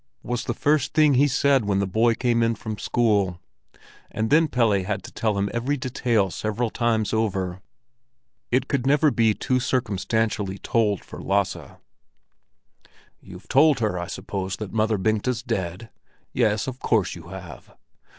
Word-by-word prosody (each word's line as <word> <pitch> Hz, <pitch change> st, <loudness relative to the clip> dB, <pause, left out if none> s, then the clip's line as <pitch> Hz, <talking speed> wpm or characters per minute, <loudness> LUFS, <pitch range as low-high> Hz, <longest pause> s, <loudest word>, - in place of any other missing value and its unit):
was 120 Hz, -1 st, -3 dB
the 120 Hz, -, -2 dB
first 150 Hz, 0 st, +1 dB
thing 155 Hz, -2 st, +5 dB
he 140 Hz, +3 st, +4 dB
said 135 Hz, -2 st, +2 dB
when 100 Hz, -1 st, +1 dB
the 100 Hz, -, +1 dB
boy 115 Hz, +5 st, +2 dB
came 120 Hz, -1 st, +1 dB
in 115 Hz, 0 st, +2 dB
from 110 Hz, +1 st, -5 dB
school; 105 Hz, -6 st, +1 dB, 0.7 s
and 110 Hz, +1 st, -2 dB
then 160 Hz, +2 st, +5 dB
Pelle 120 Hz, -6 st, +2 dB
had 100 Hz, +1 st, -3 dB
to -, -, -10 dB
tell 110 Hz, -3 st, -1 dB
him 100 Hz, 0 st, 0 dB
every 125 Hz, +5 st, -1 dB
detail 120 Hz, -6 st, 0 dB
several 110 Hz, +4 st, -2 dB
times 115 Hz, -3 st, 0 dB
over. 95 Hz, -4 st, -1 dB, 0.9 s
It 130 Hz, +2 st, +1 dB
could 135 Hz, -3 st, -1 dB
never 145 Hz, +1 st, +4 dB
be 110 Hz, -4 st, +2 dB
too 130 Hz, 0 st, 0 dB
circumstantially 110 Hz, -4 st, -1 dB
told 105 Hz, -2 st, 0 dB
for -, -, -9 dB
Lasse. 100 Hz, 0 st, -1 dB, 1.4 s
"You've -, -, -13 dB
told 145 Hz, +2 st, +5 dB
her, 105 Hz, -5 st, -1 dB
I 85 Hz, -, -4 dB
suppose, 95 Hz, -1 st, -4 dB
that 105 Hz, -2 st, -7 dB
Mother 110 Hz, -1 st, +1 dB
Bengta's 110 Hz, +4 st, 0 dB
dead? 100 Hz, -3 st, -4 dB, 0.4 s
Yes, 110 Hz, -4 st, +1 dB
of 130 Hz, -1 st, -6 dB
course 110 Hz, -6 st, +1 dB
you -, -, -11 dB
have! -, -, -11 dB
110 Hz, 160 wpm, -24 LUFS, 100-125 Hz, 1.4 s, thing